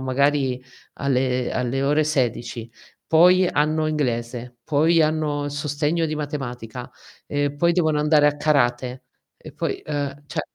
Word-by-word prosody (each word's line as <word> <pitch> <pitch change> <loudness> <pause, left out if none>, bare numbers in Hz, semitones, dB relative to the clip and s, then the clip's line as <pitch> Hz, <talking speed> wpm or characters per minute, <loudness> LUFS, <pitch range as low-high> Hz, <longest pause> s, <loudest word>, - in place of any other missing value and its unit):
magari 130 -1 +1 0.3
alle 130 -2 0
alle 125 +2 -1
ore 150 +2 +2
16, 120 -5 -2 0.4
poi, 180 +3 +5
hanno 155 -1 +1
inglese, 125 -4 -3
poi 160 +2 +3
hanno 155 -2 0
il 145 - -3
sostegno 150 +3 -1
di 155 - -3
matematica, 125 -5 -6 0.4
e 145 0 -1
poi 170 +4 +2
devono 160 -4 +1
andare 150 0 +4
a 145 0 +2
karate, 130 -4 0 0.3
e - - -12
poi - - -3
uhm, 145 -1 -3
cioè 155 - -3
145 Hz, 135 wpm, -23 LUFS, 125-155 Hz, 0.4 s, poi